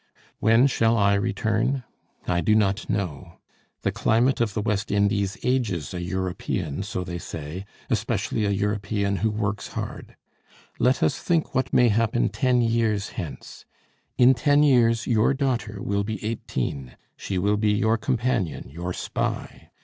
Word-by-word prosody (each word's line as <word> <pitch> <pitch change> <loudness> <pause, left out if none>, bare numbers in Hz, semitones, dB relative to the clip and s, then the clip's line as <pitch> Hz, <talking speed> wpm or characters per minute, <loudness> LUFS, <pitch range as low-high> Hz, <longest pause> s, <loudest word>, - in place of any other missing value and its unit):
When 115 +3 +5
shall 115 -4 +2
I 100 -1 +4
return? 110 +6 0 0.4
I 85 -1 +1
do 110 - +3
not 100 0 +1
know. 95 -9 -3 0.5
The - - +1
climate 120 +3 +2
of 110 -4 0
the - - 0
West 105 -1 -1
Indies 100 -1 +1
ages 105 - 0
a 90 - -4
European, 90 -3 -3
so 95 -2 -3
they 85 -1 -5
say; 80 +5 -7 0.2
especially 110 - -1
a - - +1
European 100 0 -1
who 110 - +1
works 105 -1 -2
hard. - - -6 0.6
Let 130 +1 +3
us - - +1
think 165 -3 0
what 130 - 0
may 125 -1 +5
happen 115 +2 +1
ten 125 -2 +2
years 110 -3 +1
hence. 85 -8 -8 0.5
In 125 +1 +7
ten 145 +4 +3
years 115 -5 +4
your 115 +3 +2
daughter 120 -6 -1
will 100 0 0
be 110 0 -5
eighteen; 70 - -4 0.2
she 95 - -4
will 100 +3 +2
be 105 0 +2
your 110 +2 +2
companion, 120 - -1
your 85 +4 -4
spy. - - -4
105 Hz, 150 wpm, -25 LUFS, 100-115 Hz, 0.6 s, In